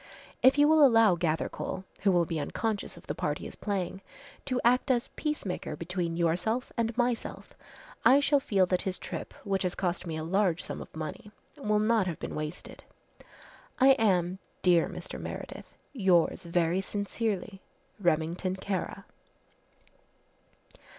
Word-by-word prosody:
If 260 +2 +6
you 290 0 +6
will 310 -1 +6
allow 225 -7 +6
Gathercole, 170 +3 -2 0.2
who 200 - +4
will 175 -2 +3
be 160 0 -3
unconscious 215 +7 -3
of - - -14
the - - -3
part - - -2
he - - -9
is - - -7
playing, 195 -2 -3 0.4
to 255 -2 0
act 250 +4 +3
as 245 -2 +1
peacemaker 210 - -3
between 170 +1 -3
yourself 180 +9 0
and 230 -1 -1
myself, 240 -1 -2 0.5
I 270 +2 +7
shall 285 0 +3
feel 195 -8 +2
that 180 0 0
his 190 -1 -2
trip, - - -6
which 195 -2 -1
has 180 -2 -1
cost 180 -1 -2
me 160 -1 -3
a 155 - -4
large 180 0 +1
sum - - -6
of - - -11
money, 155 +6 -6 0.3
will 215 -8 0
not 215 -2 +2
have 170 - -3
been - - -6
wasted. 155 +2 -6 1.0
"I 265 +1 +7
am, 190 -8 +3 0.2
dear 175 -2 +4
Mr. - - -7
Meredith, - - -7 0.3
"Yours 185 - +2
very 170 +1 +1
sincerely, 200 -1 -3 0.4
"REMINGTON 175 +1 0
KARA." 190 0 -4
190 Hz, 150 wpm, -29 LUFS, 175-225 Hz, 1.0 s, I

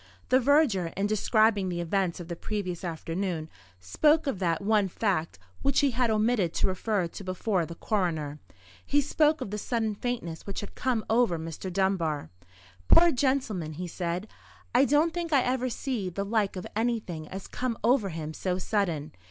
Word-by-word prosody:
The 255 - +5
verger, 265 - +3
in 195 - +1
describing 215 -1 +2
the 175 -1 -3
events 175 +1 0
of 175 - -7
the 170 - -4
previous 185 -2 -4
afternoon, 165 -1 -3 0.3
spoke 300 - +3
of 270 -10 -2
that 170 -1 0
one 210 -1 +3
fact 185 -4 -1 0.2
which 275 0 +2
he 280 -2 +3
had 245 0 +1
omitted 215 -5 +1
to - - +1
refer 190 0 0
to 170 +4 -8
before 185 -1 -1
the 170 - -8
coroner. 160 -8 -1 0.4
He 290 - +2
spoke 300 +2 +2
of 200 - -4
the 210 - -3
sudden 220 -1 -1
faintness 205 -8 -4
which 200 - -3
had 205 - -8
come 245 -4 -1
over 225 -6 +3
Mr. 165 +3 -6
Dunbar. 175 - 0 0.6
"Poor 340 0 +7
gentleman!" 245 - 0
he 180 +4 -5
said, 175 +3 -3 0.5
"I 255 +3 +6
don't 300 +4 +3
think 345 -2 -3
I 275 -4 +4
ever 255 0 0
see 235 -5 -3
the 200 +3 -3
like 205 -2 0
of 185 - -5
anything 215 -9 -1
as 190 +3 -7
come 250 -2 -3
over 235 -3 +3
him 160 -2 -5
so 180 +3 -2
sudden. 175 -6 -1
200 Hz, 175 wpm, -28 LUFS, 175-245 Hz, 0.6 s, Poor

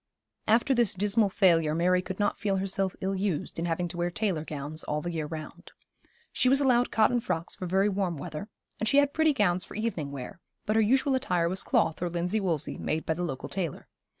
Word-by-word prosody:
After 230 +5 +4
this 235 -6 +3
dismal 205 +2 +2
failure 165 -6 +3
Mary 180 +2 +3
could 185 +1 -7
not 205 0 0
feel 200 -2 0
herself 195 0 -1
ill 190 +1 -1
used 190 -5 -2
in 170 - -1
having 175 +1 -1
to 175 - -7
wear 175 0 0
tailor 180 -4 -1
gowns 155 0 -5
all 150 - -1
the 175 +3 -4
year 160 -3 -3
round. 155 0 -8 0.6
She 255 - +2
was 270 +1 +4
allowed 250 -3 +3
cotton 225 +2 +3
frocks 175 -6 -3
for 185 - -5
very 190 +3 +2
warm 190 -4 -1
weather, 165 +6 -6 0.3
and 220 - +1
she 275 - +3
had 285 0 +4
pretty 315 -1 +3
gowns 185 -8 +1
for - - -11
evening 195 -10 -2
wear; 135 +3 -7 0.3
but 215 0 0
her 225 - +5
usual 265 +5 +3
attire 180 -10 +1
was 185 +3 -1
cloth 165 0 +1
or 175 - 0
linsey 175 +5 -1
woolsey, 170 -7 -1
made 160 +1 -2
by 160 - +1
the 170 - -5
local 135 -7 -4
tailor. 180 -6 -4
185 Hz, 220 wpm, -28 LUFS, 165-215 Hz, 0.6 s, her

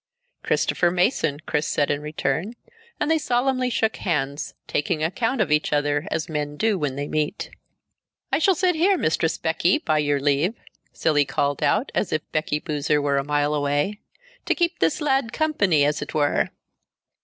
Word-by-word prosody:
"Christopher 175 - +1
Mason," 175 - +1
Chris 150 -1 -1
said 145 - +1
in 145 0 -1
return, 160 +7 -2 0.5
and 305 - 0
they 320 - +3
solemnly 255 -1 +1
shook 220 -2 0
hands, 145 -5 -2
taking 155 +1 -1
account 225 +9 -1
of 190 -8 +1
each 150 0 +2
other 145 +2 0
as 155 - -2
men 150 -2 -3
do 220 +2 +2
when 145 -4 -2
they 145 +1 -3
meet. 155 +6 -2 0.8
"I - - +2
shall 375 +3 +4
sit 360 +1 +2
here, 365 +4 +3
Mistress 160 - 0
Becky, 165 +3 +1
by 155 -1 0
your 145 -1 +1
leave," 145 - +1 0.4
Cilley 145 -2 +2
called 140 +1 -1
out, 255 - +1
as - - -1
if 155 - -1
Becky 155 -1 0
Boozer 150 0 0
were 140 -1 +1
a - - -2
mile 145 +1 0
away, 145 +8 0 0.5
"to - - +2
keep 345 0 0
this 310 - +1
lad 270 -5 +1
company, 200 - +2
as 150 0 0
it - - -6
were." 145 -2 +2
155 Hz, 175 wpm, -23 LUFS, 145-225 Hz, 0.8 s, shall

